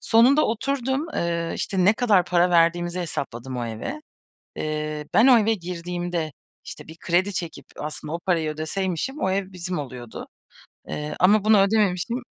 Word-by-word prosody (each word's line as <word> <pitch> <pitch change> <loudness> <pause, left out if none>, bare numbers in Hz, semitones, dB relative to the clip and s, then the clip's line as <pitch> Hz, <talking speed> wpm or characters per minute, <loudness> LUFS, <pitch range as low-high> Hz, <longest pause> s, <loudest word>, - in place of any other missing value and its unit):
Sonunda 255 +6 +5
oturdum, 265 +5 -1
eee, 170 -1 -1
işte, 185 -2 -1
ne 205 - +6
kadar 215 -6 +3
para 175 +2 +2
verdiğimizi 175 +1 +2
hesapladım 130 -6 -5
o 120 - -2
eve. 115 - -5 0.6
Eee, 155 0 -3
ben 230 - +6
o 245 -3 +8
eve 220 +1 +2
girdiğimde, 175 -3 -4 0.3
işte - - -9
bir 160 - -11
kredi 180 +4 +1
çekip 170 -3 -5
aslında 150 +1 -6
o 170 - -2
parayı 165 -4 +1
ödeseymişim, 185 - -3
o 190 - +1
ev 195 0 -2
bizim 180 0 -4
oluyordu. 125 -5 -8 0.6
Eee, 150 0 -4
ama 205 +3 +5
bunu 215 -2 +6
ödememiştim 200 +2 +1
180 Hz, 155 wpm, -24 LUFS, 160-210 Hz, 0.6 s, o